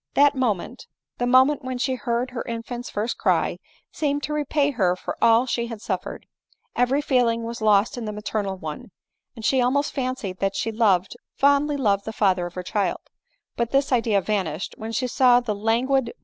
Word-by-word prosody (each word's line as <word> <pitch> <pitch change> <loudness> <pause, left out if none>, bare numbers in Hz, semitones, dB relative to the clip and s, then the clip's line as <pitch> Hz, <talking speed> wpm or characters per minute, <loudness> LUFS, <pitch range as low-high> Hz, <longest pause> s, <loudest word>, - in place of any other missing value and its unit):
That 285 0 +5
moment, 245 -2 -2 0.3
the 245 - 0
moment 260 +3 +4
when 255 -1 -4
she 260 +1 0
heard 245 0 -2
her 245 - -4
infant's 240 +1 -5
first 215 +4 -3
cry, - - +1 0.3
seemed 290 -1 -1
to 300 - -3
repay 290 -1 +1
her 185 -8 +1
for - - -5
all 230 +2 +5
she 235 -2 -2
had 230 -2 -7
suffered; 190 -3 -5 0.5
every 255 +4 +2
feeling 240 -5 +2
was 230 0 -6
lost 215 +2 +3
in 230 - -5
the 210 - -3
maternal 210 -2 -3
one; 160 +8 -7 0.5
and 225 -2 -7
she 260 +1 +3
al 245 - +3
most 285 +2 0
fancied 255 -8 -3
that 195 0 -1
she 225 - -1
loved, 200 -5 +2 0.2
fondly 285 +1 +3
loved 200 -6 +1
the 220 - -5
father 185 -4 +1
of 175 - -13
her 180 - -4
child; 205 +2 -1 0.5
but 235 -1 -1
this 275 +2 +1
idea 230 -5 +2
vanished 185 -4 -2
when 220 +1 -6
she 245 +3 -1
saw 250 0 +4
the 240 -3 -2
languid 225 +4 0
ADELINE 270 -1 +2
MOWBRAY. - - -47
235 Hz, 200 wpm, -24 LUFS, 210-260 Hz, 0.5 s, That